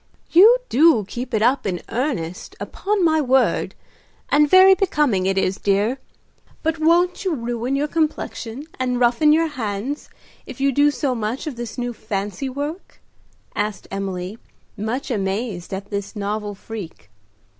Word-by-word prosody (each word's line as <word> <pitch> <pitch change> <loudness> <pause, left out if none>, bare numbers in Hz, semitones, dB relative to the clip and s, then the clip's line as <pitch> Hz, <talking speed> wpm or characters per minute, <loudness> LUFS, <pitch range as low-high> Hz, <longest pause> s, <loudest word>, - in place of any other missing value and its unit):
"You 425 +9 +8
do 270 - +4
'keep 245 +4 -6
it 220 -2 +1
up' 250 +1 +2
in 180 -2 -2
earnest, 225 - -3
upon 405 -3 -1
my 315 -1 +3
word; 260 -2 +2 0.5
and 295 0 +4
very 375 +2 +8
becoming 295 - +1
it 195 0 0
is, 195 0 +1
dear. 205 +6 +1 0.6
But 320 0 0
won't 345 +4 +3
you 370 -4 0
ruin 240 +1 -2
your 290 +2 0
complexion 295 -5 -2 0.2
and 250 -1 0
roughen 250 +5 +4
your 325 +2 +4
hands 245 +1 -4 0.4
if - - -9
you 275 0 +2
do 285 +3 +4
so 285 -2 -1
much 225 +2 -3
of 300 -5 -4
this 235 -1 -6
new 245 -1 -2
fancy 210 +4 -4
work?" 290 +7 -6 0.6
asked 210 0 -3
Emily, 195 +1 -4 0.4
much 225 +6 -3
amazed 195 -2 -2
at 195 +2 -6
this 200 +2 -4
novel 205 0 -3
freak. 190 - -9
245 Hz, 150 wpm, -21 LUFS, 205-295 Hz, 0.6 s, You